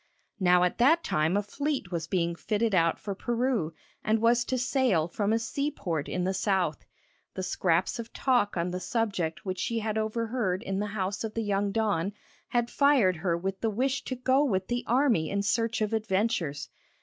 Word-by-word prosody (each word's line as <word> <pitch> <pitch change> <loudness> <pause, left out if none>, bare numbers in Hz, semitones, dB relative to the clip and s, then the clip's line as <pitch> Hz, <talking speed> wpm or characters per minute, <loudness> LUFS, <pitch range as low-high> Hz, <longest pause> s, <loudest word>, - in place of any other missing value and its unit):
Now 180 -1 +4
at 180 - 0
that 320 +8 +5
time 155 +5 +1
a 205 - 0
fleet 270 -2 -3
was 165 -2 -3
being 170 -1 0
fitted 215 +4 -1
out 165 -2 +3
for 200 - -5
Peru, 235 -5 -1 0.3
and 220 +1 +2
was 235 +2 +3
to 260 - -1
sail 245 - +2
from 205 +4 -1
a 225 - +3
seaport 225 - -2
in 180 - -1
the 190 +1 0
South. 185 -5 0 0.5
The 185 - -3
scraps 180 +2 +1
of 230 - -6
talk 245 -8 +1
on 170 +1 -1
the 180 - -3
subject 195 -7 -2
which 185 -1 -3
she 230 -1 -1
had 220 -1 -1
overheard 220 -3 -1
in 195 0 -2
the 210 - -1
house 195 +2 -2
of 220 -1 -5
the 225 - -1
young 200 -1 0
don 205 -3 0 0.3
had 240 -1 0
fired 265 - +4
her 170 0 0
with 190 +2 -4
the 225 - +1
wish 260 +6 -1
to 260 - -3
go 260 +3 +2
with 190 -9 0
the 240 0 -1
army 240 - +2
in 200 0 -1
search 230 +2 0
of 215 +1 0
adventures. 195 -8 -1
205 Hz, 195 wpm, -28 LUFS, 180-235 Hz, 0.5 s, that